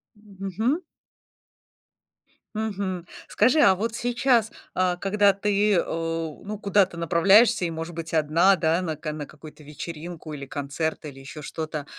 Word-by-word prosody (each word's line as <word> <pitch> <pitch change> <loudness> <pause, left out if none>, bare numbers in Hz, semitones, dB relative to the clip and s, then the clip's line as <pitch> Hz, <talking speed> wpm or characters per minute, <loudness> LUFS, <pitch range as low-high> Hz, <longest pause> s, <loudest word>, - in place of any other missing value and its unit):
М, 205 -2 -18
мгм. 225 - -1 1.7
Мгм, 200 -5 -3 0.2
скажи, 265 +5 +3
а 195 -8 +6
вот 225 +4 -3
сейчас, 240 -1 +2 0.2
а, 180 -1 +1
когда 200 +2 +3
ты 205 0 +2
у 165 -1 -3
ну, 210 0 -4
куда-то 200 -3 +2
направляешься 180 +5 +4
и, - - -1
может 165 +1 -5
быть, 165 0 -7
1, 165 +5 +4
да, 165 +1 +1
на 160 -3 -3
ка 155 0 -5
какую-то 155 +1 -14
вечеринку 160 +2 -8
или 140 -2 -6
концерт, 145 +3 -3
или 140 -3 -9
ещё 135 +3 -9
что-то, 155 0 -5
175 Hz, 140 wpm, -25 LUFS, 160-205 Hz, 1.7 s, а